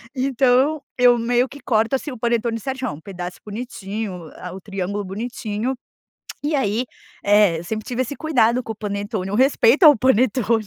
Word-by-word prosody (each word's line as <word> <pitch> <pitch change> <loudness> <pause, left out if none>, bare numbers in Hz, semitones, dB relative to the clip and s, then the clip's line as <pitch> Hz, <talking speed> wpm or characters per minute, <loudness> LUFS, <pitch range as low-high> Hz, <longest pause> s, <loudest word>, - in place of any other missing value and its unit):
Então 265 +3 +2 0.2
eu 245 -1 +5
meio 245 +2 +2
que 285 +3 -12
corto 225 +2 +1
assim 275 +2 -4
o 250 - -7
panetone 235 0 0
certinho. 260 - -4
Pedaço 180 -1 -7
bonitinho, 205 - -6
a 180 - -7
o 190 - -9
triângulo 200 +1 -3
bonitinho. 225 +3 -3 0.7
E 300 +1 0
aí 240 -3 +1 0.4
é 205 -4 +4
eu 165 - -7
sempre 215 +4 -4
tive 250 +1 -1
esse 260 +3 -5
cuidado 250 -6 +2
com 225 - -5
o - - -12
panetone. 200 -2 -4
O - - -3
respeito 265 - +4
ao 300 -2 +9
panetone. 230 -2 +2
230 Hz, 170 wpm, -21 LUFS, 205-255 Hz, 0.7 s, ao